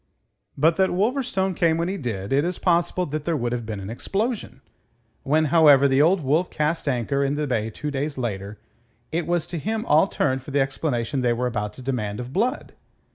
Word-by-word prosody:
But 160 +4 +3
that 190 -1 +3
Wolverstone 195 -2 0
came 165 -1 +2
when 170 +1 -1
he 190 - -2
did, 115 - -4
it 140 +2 +3
is 175 +2 -2
possible 175 0 +1
that 150 0 -4
there 170 -2 0
would 120 -2 -2
have 120 -2 -3
been 105 -3 -4
an 100 +2 -6
explosion. 200 - -3 0.6
When, 155 +3 +2
however, 145 -4 +7
the 135 +1 +3
Old 175 +4 +4
Wolf 155 +6 +1
cast 155 +1 -1
anchor 140 +1 0
in 140 +1 0
the 150 0 -1
bay 115 -5 -1
two 150 +6 -5
days 140 +1 -3
later, 105 -4 -4 0.5
it 165 0 -2
was 175 -2 0
to 170 - -5
him 220 +6 -2
all 155 +6 +4
turned 130 -7 0
for 130 - -11
the 140 0 +1
explanation 135 -1 -1
they 120 -1 +2
were 125 +2 -2
about 105 -4 -2
to 130 - -11
demand 110 -5 -2
of 125 +1 -7
Blood. 245 - -1
145 Hz, 210 wpm, -24 LUFS, 125-170 Hz, 0.6 s, however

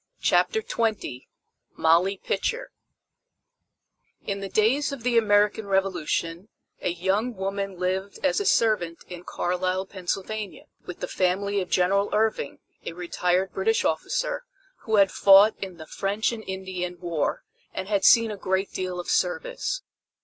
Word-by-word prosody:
CHAPTER 440 -1 +2
XX 215 - -2 0.5
MOLLY 175 +5 +3
PITCHER 485 - -2 1.5
In 200 -1 -2
the 195 -1 -5
days 265 +9 +2
of 275 -5 -7
the 245 -1 +1
American 210 -1 +3
Revolution 185 -1 -1 0.3
a - - 0
young 190 +7 -1
woman 195 0 -3
lived 190 +2 -2
as 285 +5 +2
a 410 - -2
servant 190 -7 +2
in 175 -1 -8
Carlisle, 185 +1 -1
Pennsylvania, 195 +2 -4 0.2
with 180 - -8
the - - -2
family 195 +2 0
of 180 - -5
General 195 +3 +2
Irving, 215 -9 0 0.3
a - - -5
retired 180 +1 -1
British 220 +4 +1
officer, - - -1 0.4
who 220 - +1
had 195 -2 +5
fought 200 +2 +7
in 190 -3 -6
the 155 - -9
French 200 +7 -1
and 225 -2 -6
Indian 185 -2 -4
War 170 -4 -2 0.3
and 190 - -5
had 200 -2 0
seen 230 -1 +6
a 210 - -6
great 190 +1 -1
deal 185 -1 -3
of 175 - -6
service. - - -1
195 Hz, 140 wpm, -25 LUFS, 180-220 Hz, 1.5 s, fought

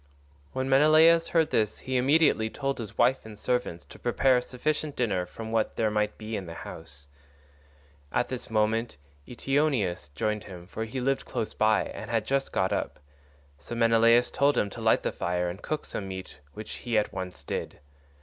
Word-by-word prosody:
When 130 0 -2
Menelaus 155 +4 +6
heard 165 -2 +2
this 110 -1 +1
he 130 0 -4
immediately 130 -4 +3
told 135 +2 -3
his 110 -3 -7
wife 130 +1 +3
and 110 -1 -11
servants 125 -8 -1
to - - -14
prepare 130 -2 +3
a - - +1
sufficient 150 +4 -2
dinner 95 -7 0
from 110 0 -8
what 115 -1 0
there 110 -2 +1
might 105 0 0
be 110 0 -5
in 95 -4 -5
the 85 - -7
house. 75 -5 -10 1.1
At 125 - +1
this 130 -2 -6
moment 110 - 0 0.3
Eteoneus 125 - 0
joined 105 +5 -1
him, 90 -3 -10
for 110 +4 -5
he 115 +4 -5
lived 135 +2 0
close 115 -3 -3
by 110 0 +3
and - - -8
had 115 -2 0
just 135 +2 0
got 95 - +1
up; - - -3 0.6
so 70 - -7
Menelaus 115 +1 +4
told 140 +1 +2
him 100 - +1
to - - -8
light - - +3
the - - 0
fire 90 0 -1
and 90 +3 -7
cook 155 - -3
some 100 - -5
meat, 95 -4 -8 0.2
which 110 - -7
he 120 -3 -1
at 105 - 0
once 95 -1 -6
did. - - -4
115 Hz, 190 wpm, -28 LUFS, 105-130 Hz, 1.1 s, Menelaus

